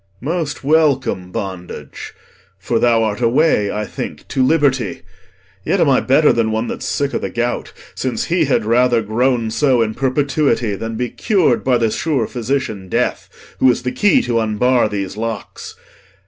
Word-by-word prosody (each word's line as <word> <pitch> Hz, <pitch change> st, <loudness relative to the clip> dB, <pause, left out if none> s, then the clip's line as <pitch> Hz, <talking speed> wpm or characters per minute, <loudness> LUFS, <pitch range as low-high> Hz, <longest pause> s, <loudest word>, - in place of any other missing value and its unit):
Most 155 Hz, +1 st, -3 dB
welcome, 135 Hz, -, +1 dB
bondage! 95 Hz, -3 st, -7 dB, 0.4 s
for 115 Hz, +4 st, -1 dB
thou 115 Hz, -1 st, +3 dB
art 110 Hz, +1 st, -2 dB
a 115 Hz, -, +3 dB
way, 120 Hz, -6 st, +2 dB
I 105 Hz, 0 st, -3 dB
think, -, -, -7 dB
to 130 Hz, -, -1 dB
liberty. 135 Hz, -, +1 dB, 0.6 s
Yet 195 Hz, -, 0 dB
am 160 Hz, -, +3 dB
I 130 Hz, -, +4 dB
better 145 Hz, +3 st, +3 dB
Than 115 Hz, -1 st, +1 dB
one 110 Hz, +1 st, -1 dB
that's -, -, -5 dB
sick 140 Hz, 0 st, -1 dB
o' -, -, 0 dB
th' -, -, -4 dB
gout, 120 Hz, +1 st, -2 dB, 0.2 s
since 125 Hz, -4 st, -2 dB
he 170 Hz, -1 st, +1 dB
had 125 Hz, -5 st, +1 dB
rather 120 Hz, 0 st, +3 dB
Groan 115 Hz, +1 st, 0 dB
so 130 Hz, -2 st, +2 dB
in 110 Hz, -1 st, -3 dB
perpetuity 135 Hz, -2 st, 0 dB
than 115 Hz, +3 st, -5 dB
be 125 Hz, +1 st, -3 dB
cur'd 185 Hz, -, +1 dB
By 130 Hz, -2 st, +3 dB
th' 115 Hz, -2 st, 0 dB
sure 145 Hz, -8 st, 0 dB
physician 115 Hz, -5 st, -3 dB
death, -, -, -1 dB, 0.3 s
who 130 Hz, -, +5 dB
is 125 Hz, -, 0 dB
the 125 Hz, -, -1 dB
key 195 Hz, +10 st, +3 dB
T' 125 Hz, -, -3 dB
unbar 115 Hz, +2 st, +2 dB
these 100 Hz, -1 st, -4 dB
locks. 115 Hz, 0 st, -6 dB
120 Hz, 175 wpm, -18 LUFS, 110-135 Hz, 0.6 s, who